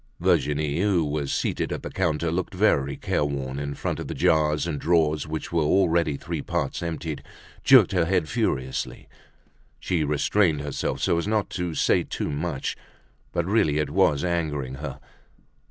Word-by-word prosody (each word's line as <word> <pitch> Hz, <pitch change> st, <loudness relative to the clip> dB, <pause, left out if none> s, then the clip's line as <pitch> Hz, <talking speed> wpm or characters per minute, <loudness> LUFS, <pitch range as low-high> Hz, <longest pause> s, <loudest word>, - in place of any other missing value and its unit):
Virginie, 75 Hz, +1 st, +1 dB
who 95 Hz, -5 st, +2 dB
was 75 Hz, -1 st, -2 dB
seated -, -, -1 dB
at -, -, -4 dB
the -, -, -6 dB
counter 85 Hz, -3 st, 0 dB
looking 90 Hz, +2 st, -3 dB
very 70 Hz, -9 st, +2 dB
careworn 70 Hz, -2 st, -2 dB
in 70 Hz, 0 st, -4 dB
front -, -, -3 dB
of -, -, -5 dB
the -, -, -5 dB
jars 75 Hz, -1 st, +2 dB
and 80 Hz, -4 st, -3 dB
drawers 80 Hz, -3 st, +2 dB
which 80 Hz, 0 st, -5 dB
were 85 Hz, -, +2 dB
already 85 Hz, -2 st, +2 dB
three 85 Hz, -1 st, -4 dB
parts 85 Hz, -5 st, -2 dB
emptied, 80 Hz, -3 st, -4 dB, 0.4 s
jerked -, -, +7 dB
her 90 Hz, -3 st, +2 dB
head 90 Hz, -2 st, +1 dB
furiously. 65 Hz, -2 st, -2 dB, 0.7 s
She 85 Hz, -4 st, 0 dB
restrained 75 Hz, +2 st, +2 dB
herself 75 Hz, -1 st, -3 dB
so 85 Hz, -, +2 dB
as 85 Hz, -, -3 dB
not 110 Hz, -1 st, 0 dB
to 90 Hz, -3 st, -3 dB
say -, -, +3 dB
too -, -, -4 dB
much, 75 Hz, -1 st, -3 dB, 0.6 s
but 85 Hz, -, -1 dB
really 95 Hz, -7 st, +2 dB
it 75 Hz, -2 st, -1 dB
was 70 Hz, -1 st, +3 dB
angering 75 Hz, -7 st, -1 dB
her. 75 Hz, -, -6 dB
80 Hz, 165 wpm, -25 LUFS, 75-85 Hz, 0.7 s, jerked